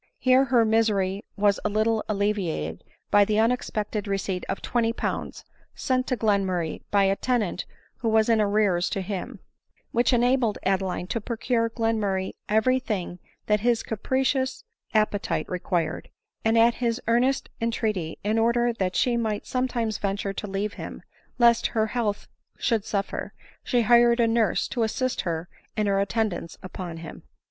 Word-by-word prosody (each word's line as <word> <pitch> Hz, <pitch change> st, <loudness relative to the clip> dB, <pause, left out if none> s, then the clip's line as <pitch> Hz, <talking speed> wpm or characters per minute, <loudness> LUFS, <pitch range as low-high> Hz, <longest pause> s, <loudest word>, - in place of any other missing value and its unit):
Here 260 Hz, +1 st, +4 dB
their 235 Hz, -3 st, +4 dB
misery 210 Hz, -3 st, +1 dB
was 205 Hz, 0 st, +3 dB
a -, -, +1 dB
little 215 Hz, +1 st, +1 dB
alleviated 195 Hz, -, -1 dB, 0.3 s
by 205 Hz, -, +7 dB
the 210 Hz, +1 st, 0 dB
unex 230 Hz, +3 st, +2 dB
pected 210 Hz, -1 st, -3 dB
receipt 195 Hz, -2 st, -2 dB
of 190 Hz, -, -2 dB
twenty 230 Hz, -1 st, 0 dB
pounds, -, -, -4 dB, 0.3 s
sent 255 Hz, -1 st, 0 dB
to 255 Hz, -, 0 dB
Glenmurray 190 Hz, -7 st, 0 dB
by 200 Hz, -1 st, +3 dB
a 195 Hz, 0 st, +3 dB
tenant 220 Hz, -6 st, -1 dB, 0.3 s
who 230 Hz, -, -1 dB
was 220 Hz, 0 st, +3 dB
in 225 Hz, -2 st, +4 dB
arrears 200 Hz, -4 st, +2 dB
to 195 Hz, -, -2 dB
him, 190 Hz, -1 st, -5 dB, 0.5 s
which 240 Hz, +3 st, +2 dB
enabled 245 Hz, -2 st, +2 dB
Adeline 190 Hz, -2 st, 0 dB
to 230 Hz, +5 st, -3 dB
procure 230 Hz, +1 st, 0 dB
Glenmurray 215 Hz, -5 st, -1 dB, 0.2 s
every 220 Hz, +5 st, +3 dB
thing 185 Hz, -7 st, -4 dB, 0.3 s
that 210 Hz, 0 st, +2 dB
his 235 Hz, +1 st, +1 dB
capricious 260 Hz, -, -1 dB, 0.3 s
appetite* 215 Hz, -2 st, 0 dB
required; 180 Hz, -2 st, -2 dB, 0.3 s
and 225 Hz, +1 st, +3 dB
at 230 Hz, +1 st, +6 dB
his 235 Hz, 0 st, +1 dB
earnest 250 Hz, +4 st, +2 dB
entreaty, 215 Hz, -7 st, -1 dB
in 215 Hz, +2 st, +1 dB
order 235 Hz, +1 st, +2 dB
that 190 Hz, -4 st, -2 dB
she 240 Hz, -2 st, +2 dB
might 220 Hz, -3 st, -2 dB
sometimes 240 Hz, -4 st, -1 dB
venture 200 Hz, 0 st, -2 dB
to 210 Hz, -, -5 dB
leave 200 Hz, +1 st, -2 dB
him, -, -, -7 dB, 0.3 s
lest 235 Hz, -1 st, +5 dB
her 220 Hz, -, +4 dB
health 215 Hz, -2 st, -2 dB, 0.3 s
should 225 Hz, -4 st, 0 dB
suffer, 200 Hz, -1 st, -3 dB, 0.3 s
she 245 Hz, -2 st, +2 dB
hired 235 Hz, +1 st, +5 dB
a 235 Hz, -, +4 dB
nurse 225 Hz, -1 st, +1 dB
to 240 Hz, -, -3 dB
assist 245 Hz, +3 st, 0 dB
her 170 Hz, -2 st, -3 dB, 0.3 s
in 215 Hz, -, +2 dB
her 200 Hz, -1 st, +2 dB
attendance 200 Hz, -4 st, -1 dB
upon 180 Hz, -2 st, -6 dB
him. -, -, -9 dB
215 Hz, 155 wpm, -25 LUFS, 195-235 Hz, 0.5 s, by